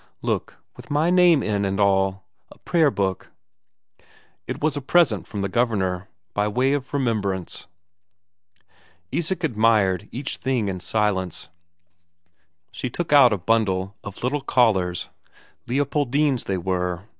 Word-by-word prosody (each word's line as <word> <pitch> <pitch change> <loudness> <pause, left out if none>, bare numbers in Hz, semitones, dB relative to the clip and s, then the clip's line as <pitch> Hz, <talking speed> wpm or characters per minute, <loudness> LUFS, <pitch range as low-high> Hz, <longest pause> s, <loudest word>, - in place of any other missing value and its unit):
"Look, - - -2 0.2
with - - -13
my 150 +4 +2
name 175 -5 +5
in 100 -1 0
and 95 0 -1
all. 95 -1 +2 0.3
A - - -16
prayer 165 -4 +2
book." 95 -6 -2 1.2
It - - -4
was 155 -1 0
a 145 - -3
present 135 - +2
from 105 - -5
the - - 0
Governor, 100 -4 0 0.3
by 105 0 0
way 125 +6 +1
of 140 -2 -3
remembrance. 105 - -2 1.4
Isak 175 +1 -2
admired 110 - +2
each 135 +3 -4
thing 125 -6 -1
in 90 -1 -4
silence. 95 -2 -1 1.2
She 130 - -4
took 160 +5 -3
out 135 -4 +8
a 105 - +1
bundle 95 0 0
of 100 +2 -9
little 140 +4 0
collars 95 -10 +1 0.6
Leopoldine's, 140 0 0
they 95 - -1
were. 90 0 -2
110 Hz, 135 wpm, -23 LUFS, 95-140 Hz, 1.4 s, out